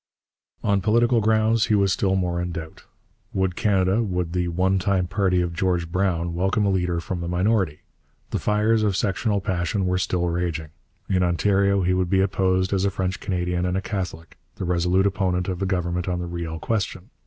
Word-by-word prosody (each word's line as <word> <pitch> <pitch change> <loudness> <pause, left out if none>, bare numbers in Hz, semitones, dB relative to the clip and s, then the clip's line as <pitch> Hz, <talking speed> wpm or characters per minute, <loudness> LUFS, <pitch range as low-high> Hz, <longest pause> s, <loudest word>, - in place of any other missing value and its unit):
On 100 -1 +2
political 115 +2 +3
grounds 110 +1 +2
he 105 - +3
was 100 -2 +3
still 95 -1 +1
more 90 -2 0
in 90 0 -3
doubt. 80 -2 -8 0.5
Would 95 -2 0
Canada, 100 0 +2
would 90 -5 -2
the 90 -1 0
one 95 +3 +1
time 95 -1 +1
party 95 -1 +1
of 85 -1 -2
George 85 -1 -1
Brown, 90 -2 0
welcome 95 +4 +1
a 100 - +2
leader 90 -2 0
from 85 +1 -4
the 85 - -4
minority? 90 -3 0 0.5
The - - -1
fires 110 +1 +2
of 105 -3 +1
sectional 100 +1 0
passion 95 0 -1
were 90 0 +1
still 90 -1 0
raging. 85 -3 -2 0.4
In 95 -2 +1
Ontario 100 +2 +2
he 90 +1 +2
would 90 -1 0
be 95 0 +3
opposed 95 -1 +1
as 95 -1 +1
a 100 - +3
French 95 -1 -2
Canadian 90 -1 -1
and 90 +1 0
a - - +1
Catholic, 90 -6 -5 0.2
the 95 - -4
resolute 90 +2 +2
opponent 95 -2 0
of 90 -2 -3
the 95 - -1
Government 90 -1 -1
on 90 -1 -1
the 90 - -3
Riel 85 -1 -4
question. 100 +1 -3
95 Hz, 195 wpm, -24 LUFS, 90-100 Hz, 0.5 s, political